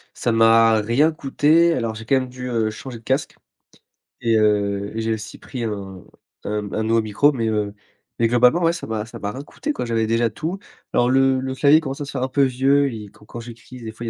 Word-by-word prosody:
Ça 120 - -1
m'a 115 0 +5
rien 130 +9 +2
coûté, 155 +3 +2
alors, 115 -5 -2
j'ai 110 0 -9
quand 135 - +2
même 130 -1 -1
dû, 125 0 -7
heu, 115 -2 0
changer 125 +2 -8
de 115 - -17
casque 135 +4 -1 0.9
et 115 -2 +2
heu, 100 -1 +1
et 115 - -2
j'ai 110 0 0
aussi 110 -1 -7
pris 125 -3 -7
un 100 -4 -5 0.4
un 105 -1 -3
un 110 - -1
nouveau 115 +1 +2
micro 110 +8 +2
mais, 115 -5 -2
heu, 105 -2 -1 0.5
mais 115 - +3
globalement, 125 +8 +4
ouais 165 0 +3
ça 175 - -6
m'a 110 -1 -3
ça 115 0 -10
m'a 100 -1 -4
rien 130 - -7
coûté 300 - -5
quoi - - -4
j'avais 115 -1 0
déjà 115 +1 +1
tout. 170 - -5 0.3
Alors 120 0 +3
le 135 0 +3
le 130 0 -4
clavier 145 +4 +5
commence 140 -2 -6
à - - -3
se 145 - -8
faire - - -4
un 130 - 0
peu 140 +1 +2
vieux 135 +2 +2
et 105 -2 -8
quand 105 - -20
quand 120 - -9
j'écris 120 +1 -11
des 110 - -6
fois, 115 +2 -9
il - - -2
115 Hz, 245 wpm, -21 LUFS, 110-135 Hz, 0.9 s, m'a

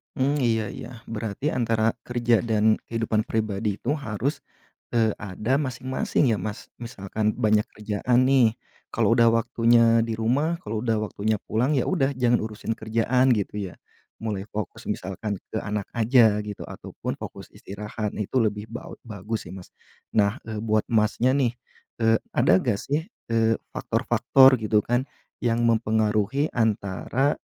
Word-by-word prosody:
Mmm, 140 +3 +1
iya 110 -3 +1
iya, - - -8 0.2
berarti 110 +4 -3
antara 115 -5 +1
kerja 120 -2 +1
dan 110 -1 +3
kehidupan 115 -1 -1
pribadi 105 -3 -2
itu 140 +5 0
harus, 135 0 -3 0.5
eee, 115 -3 +2
ada 105 +6 -2
masing-masing 130 -1 -1
ya - - -4
Mas? 105 +3 -6
Misalkan 110 -2 -2
banyak 110 -2 +2
kerjaan 115 +5 +1
nih, 125 -5 +4 0.3
kalau - - +2
udah 115 -1 +5
waktunya 115 0 +4
di 115 -1 -3
rumah 145 +9 +1
kalau 110 +1 -3
udah 115 -3 +1
waktunya 110 0 -1
pulang, 125 +6 +1
ya - - -1
udah 140 -7 +1
jangan 120 -1 +3
urusin 110 +1 -4
kerjaan 115 +4 +2
gitu 105 -3 0 0.2
ya. - - -14 0.5
Mulai 105 -4 -3
fokus 105 -2 -5
misalkan 95 +2 -3
ke - - -2
anak 105 -1 -3
aja 115 -2 +4
gitu, 105 -1 -6
ataupun - - -6
fokus - - -9
istirahat 105 +2 -5
itu 105 - -4
lebih 105 0 -2
bau 115 +2 -9
bagus 105 +1 -5
sih - - -8
Mas. 90 - -11 0.4
Nah, 100 0 +2
eee, 110 -2 -5
buat 110 -1 +1
Masnya 110 +3 +2
nih, 125 -4 +1 0.5
eee, 115 0 +4 0.2
ada 90 - +5
gak 105 -3 0
sih, 150 +4 -1 0.2
eee, 115 0 +3 0.2
faktor-faktor 130 -2 +4
gitu 105 -1 +2
kan, 120 +3 0 0.3
yang 120 0 +1
mempengaruhi 110 +4 +1
antara, 110 +5 0
115 Hz, 150 wpm, -25 LUFS, 105-120 Hz, 0.5 s, udah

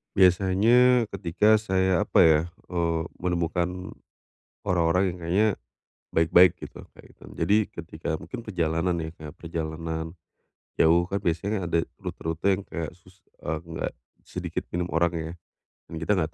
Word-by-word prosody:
Biasanya 105 +6 +4
ketika 100 +4 +3
saya 95 -3 +1
apa - - +3
ya, 80 -1 +5 0.3
eee, 85 -2 0 0.2
menemukan 90 +1 -2 0.8
orang-orang 90 +1 +2
yang - - -11
kayaknya 95 +6 +3 0.7
baik-baik 85 +2 +6
gitu, - - -9
nah - - -18
itu. - - -19
Jadi 105 - +2 0.2
ketika 80 -1 -5
mungkin 85 +8 -8
perjalanan 85 -3 0
ya 80 - -4
kayak 75 -2 -9
perjalanan 80 0 -4 0.6
jauh 85 +2 +4
kan 100 +1 -3
biasanya 95 +4 -1
ada 85 -1 0
rute-rute 90 +4 -1
yang - - -9
kayak 80 -2 -4
susus 95 +1 -22 0.2
eee, 80 +1 -4
nggak 80 -1 -4 0.4
sedikit - - -5
minim 90 0 -2
orang 85 +1 +2
ya. 80 0 -4 0.5
Mmm, 80 -1 -8
kita 100 +5 +1
enggak 80 -2 -1
85 Hz, 140 wpm, -26 LUFS, 80-95 Hz, 0.8 s, baik-baik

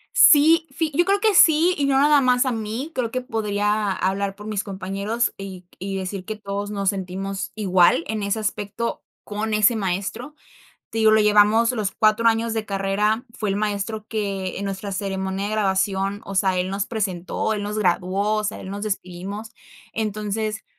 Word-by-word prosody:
Sí, 325 -7 +6
fi 320 -2 -2
yo 345 - +3
creo 395 +2 +2
que 430 0 +3
sí 335 0 +6
y 285 - 0
no 275 -1 +2
nada 290 0 +5
más 250 0 +3
a 260 - +1
mí. 225 +6 -4
Creo 245 -5 -1
que 255 +2 -3
podría 210 -3 -1
hablar 195 +1 -1
por 210 - -11
mis 210 -1 -2
compañeros 200 +4 -2
y 190 -2 -8
y 195 +1 -4
decir 190 0 -4
que 215 +3 -5
todos 205 -1 -5
nos 200 -2 0
sentimos 195 0 -4
igual 185 -5 +3
en 220 0 -3
ese 200 +2 -1
aspecto 215 +1 -3 0.2
con 215 +1 -2
ese 215 +3 +4
maestro. 200 +9 -3 0.6
Te 225 - -4
digo, 220 -1 +5
lo 220 - +5
llevamos 210 +2 +5
los 215 -5 -2
4 215 +1 +3
años 225 0 0
de 220 -1 -2
carrera, 200 +3 0
fue 210 -2 -1
el 195 - 0
maestro 210 +1 -2
que 200 -4 -3
en 200 - -4
nuestra 195 0 -4
ceremonia 190 0 -3
de - - -4
graduación, 195 -1 0
o 195 - -7
sea, 190 -1 +2
él 180 +1 -1
nos 200 +1 -2
presentó, 200 -2 -2
él 210 -1 -2
nos 210 +1 -3
graduó, 190 +2 +1
o 215 - -1
sea, 210 - -3
él 190 - -8
nos 200 +1 -5
despedimos. 200 +1 -5 0.4
Entonces, 215 0 -3
210 Hz, 190 wpm, -23 LUFS, 195-225 Hz, 0.6 s, Sí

